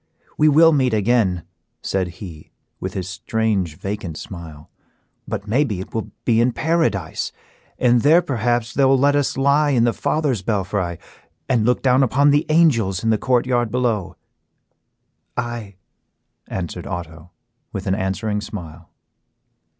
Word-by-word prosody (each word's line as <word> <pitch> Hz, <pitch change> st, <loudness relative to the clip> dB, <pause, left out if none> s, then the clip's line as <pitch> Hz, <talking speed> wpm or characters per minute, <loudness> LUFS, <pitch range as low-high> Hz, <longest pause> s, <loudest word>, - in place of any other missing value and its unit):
"We 155 Hz, 0 st, +4 dB
will 165 Hz, +2 st, +6 dB
meet 130 Hz, -5 st, +2 dB
again," 105 Hz, -5 st, +1 dB, 0.4 s
said 95 Hz, -2 st, -1 dB
he, 85 Hz, -7 st, -10 dB, 0.3 s
with 95 Hz, 0 st, -5 dB
his 95 Hz, -2 st, -3 dB
strange, 95 Hz, -3 st, -1 dB
vacant 95 Hz, -5 st, -5 dB
smile, 80 Hz, -5 st, -9 dB, 0.6 s
"but 100 Hz, -, -4 dB
maybe 110 Hz, -3 st, +1 dB
it 95 Hz, -, -8 dB
will 110 Hz, -, -3 dB, 0.2 s
be 115 Hz, -1 st, +3 dB
in 120 Hz, +1 st, +2 dB
Paradise, 120 Hz, -, 0 dB, 0.5 s
and 120 Hz, -1 st, +3 dB
there 165 Hz, +6 st, +5 dB
perhaps 120 Hz, -2 st, -1 dB
they 140 Hz, -, +2 dB
will 135 Hz, 0 st, +5 dB
let 145 Hz, +2 st, +3 dB
us 145 Hz, -2 st, 0 dB
lie 140 Hz, +2 st, +3 dB
in 125 Hz, -5 st, +3 dB
the 120 Hz, -1 st, +2 dB
father's 145 Hz, -6 st, 0 dB
belfry, 95 Hz, -4 st, -2 dB, 0.5 s
and 120 Hz, -5 st, +2 dB
look 125 Hz, -, +1 dB
down 130 Hz, 0 st, +4 dB
upon 140 Hz, +3 st, +4 dB
the 145 Hz, +2 st, +2 dB
angels 115 Hz, -, +3 dB
in 115 Hz, -, +2 dB
the 110 Hz, -, +1 dB
court 125 Hz, -2 st, +2 dB
yard 120 Hz, -2 st, +1 dB
below." 115 Hz, -6 st, -1 dB, 1.2 s
"Aye," 115 Hz, -4 st, -4 dB, 0.7 s
answered 90 Hz, -3 st, -5 dB
Otto, 85 Hz, -1 st, -7 dB, 0.4 s
with -, -, -5 dB
an 95 Hz, -, +1 dB
answering 105 Hz, +2 st, -2 dB
smile. 85 Hz, -5 st, -9 dB
115 Hz, 145 wpm, -21 LUFS, 95-130 Hz, 1.2 s, will